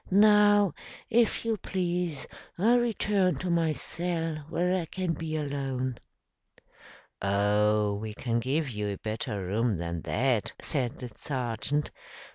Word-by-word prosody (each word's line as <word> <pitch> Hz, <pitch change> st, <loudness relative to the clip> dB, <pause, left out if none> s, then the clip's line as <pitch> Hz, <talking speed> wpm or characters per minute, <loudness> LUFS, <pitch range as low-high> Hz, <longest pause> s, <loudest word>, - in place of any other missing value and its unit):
"Now, 205 Hz, -2 st, +6 dB, 0.4 s
if 230 Hz, 0 st, +3 dB
you 225 Hz, -1 st, +1 dB
please, 175 Hz, -7 st, -2 dB, 0.3 s
I'll 230 Hz, +7 st, +4 dB
return 210 Hz, -5 st, +1 dB
to 185 Hz, -1 st, -2 dB
my 165 Hz, -2 st, +2 dB
cell 165 Hz, 0 st, -2 dB
where 180 Hz, +2 st, +1 dB
I 180 Hz, -3 st, -1 dB
can 180 Hz, 0 st, -2 dB
be 160 Hz, -1 st, -4 dB
alone." 135 Hz, -4 st, -2 dB, 1.2 s
"Oh, 105 Hz, +1 st, +2 dB
we 105 Hz, +1 st, -5 dB
can 120 Hz, 0 st, -1 dB
give 140 Hz, +6 st, 0 dB
you 105 Hz, -2 st, -3 dB
a 100 Hz, -1 st, -3 dB
better 105 Hz, -2 st, -3 dB
room 105 Hz, +2 st, +1 dB
than 85 Hz, 0 st, -3 dB
that," 125 Hz, 0 st, 0 dB
said 125 Hz, -5 st, -1 dB
the 125 Hz, -2 st, -8 dB
sergeant. 130 Hz, +2 st, -1 dB
145 Hz, 130 wpm, -28 LUFS, 110-180 Hz, 1.2 s, Now